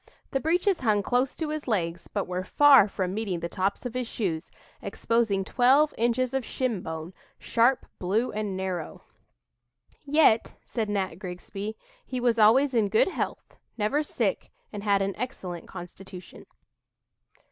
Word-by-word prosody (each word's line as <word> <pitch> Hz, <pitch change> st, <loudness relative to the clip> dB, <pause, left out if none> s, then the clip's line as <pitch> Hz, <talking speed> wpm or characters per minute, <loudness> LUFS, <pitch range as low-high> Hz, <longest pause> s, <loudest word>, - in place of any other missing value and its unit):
The 270 Hz, -, +1 dB
breeches 350 Hz, +5 st, +1 dB
hung 215 Hz, -5 st, +2 dB
close 250 Hz, +4 st, +1 dB
to 320 Hz, -2 st, -3 dB
his 305 Hz, -1 st, -4 dB
legs, 170 Hz, -6 st, -1 dB
but 200 Hz, -, -2 dB
were 180 Hz, 0 st, -3 dB
far 275 Hz, +1 st, +6 dB
from 185 Hz, -2 st, -3 dB
meeting 200 Hz, -5 st, -2 dB
the 170 Hz, -, -3 dB
tops 195 Hz, +5 st, -2 dB
of 245 Hz, -, -4 dB
his 250 Hz, -1 st, -2 dB
shoes, 180 Hz, -8 st, -3 dB, 0.3 s
exposing 210 Hz, -1 st, 0 dB
'twelve 270 Hz, +7 st, +4 dB
inches 240 Hz, +2 st, 0 dB
of 265 Hz, -1 st, 0 dB
shinbone, 180 Hz, -10 st, -3 dB, 0.2 s
sharp, 240 Hz, +3 st, +2 dB
blue 210 Hz, +7 st, 0 dB
and 210 Hz, -3 st, -3 dB
narrow.'" 185 Hz, -4 st, -4 dB, 1.0 s
"Yet," 290 Hz, -6 st, +3 dB
said 220 Hz, -3 st, -3 dB
Nat 190 Hz, -4 st, -2 dB
Grigsby, 195 Hz, +4 st, -6 dB, 0.3 s
"he 255 Hz, -, -4 dB
was 240 Hz, -2 st, +2 dB
always 255 Hz, +6 st, +5 dB
in 220 Hz, -4 st, +2 dB
good 220 Hz, -, +3 dB
health, -, -, -5 dB, 0.2 s
never 220 Hz, +8 st, +1 dB
sick, 300 Hz, -, -2 dB, 0.2 s
and 205 Hz, -1 st, -6 dB
had 200 Hz, -2 st, +2 dB
an 195 Hz, 0 st, -2 dB
excellent 185 Hz, -9 st, -5 dB
constitution." 180 Hz, 0 st, -11 dB
215 Hz, 145 wpm, -27 LUFS, 190-255 Hz, 1.0 s, far